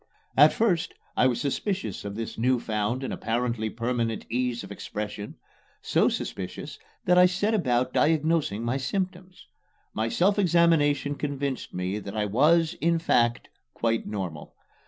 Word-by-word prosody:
At 150 +3 +7
first 195 -7 0 0.2
I 125 - +4
was 120 -2 0
suspicious 140 - -2
of 100 0 -5
this 115 0 -5
new 125 +2 +2
found 110 +4 -2
and - - -3
apparently 115 -1 -1
permanent 115 0 -2
ease 125 0 -1
of - - -10
expression 105 0 -6 0.4
so - - +2
suspicious - - -5 0.3
that 180 0 +5
I 180 - +8
set 200 +5 0
about 130 - +1
diagnosing 155 -8 +1
my 120 +3 0
symptoms. 185 +5 -4 0.5
My 110 +1 -1
self 200 - +2
examination 160 -6 +3
convinced 140 -2 -3
me 90 +3 -2
that 100 +1 -7
I 105 - +1
was, 155 - +3
in 170 +1 +3
fact, 120 -7 +1 0.3
quite 115 -1 0
normal. 90 -8 -5
125 Hz, 145 wpm, -26 LUFS, 115-165 Hz, 0.5 s, I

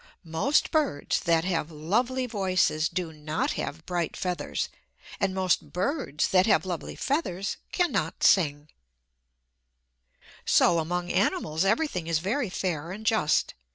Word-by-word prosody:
Most 165 - +1
birds 295 - +1
that 165 0 +2
have 170 -4 -1
lovely 235 +12 0
voices 185 -8 +1
do 175 -3 -3
not 155 +1 -2
have 160 +3 -5
bright 175 -3 -2
feathers; 180 -5 -2 0.5
and - - +1
most 185 -1 0
birds 185 - -1
that 185 +1 +4
have 180 -5 +3
lovely 175 -3 -4
feathers 205 - -2
cannot 350 -6 0
sing. 150 -5 +3 1.7
So 170 - +4
among 175 +2 -2
animals 155 +3 +1
everything 205 - 0
is 165 -1 +2
very 210 - -1
fair 175 -3 -3
and 215 +3 -8
just. 220 -9 +2
180 Hz, 125 wpm, -27 LUFS, 160-210 Hz, 1.7 s, that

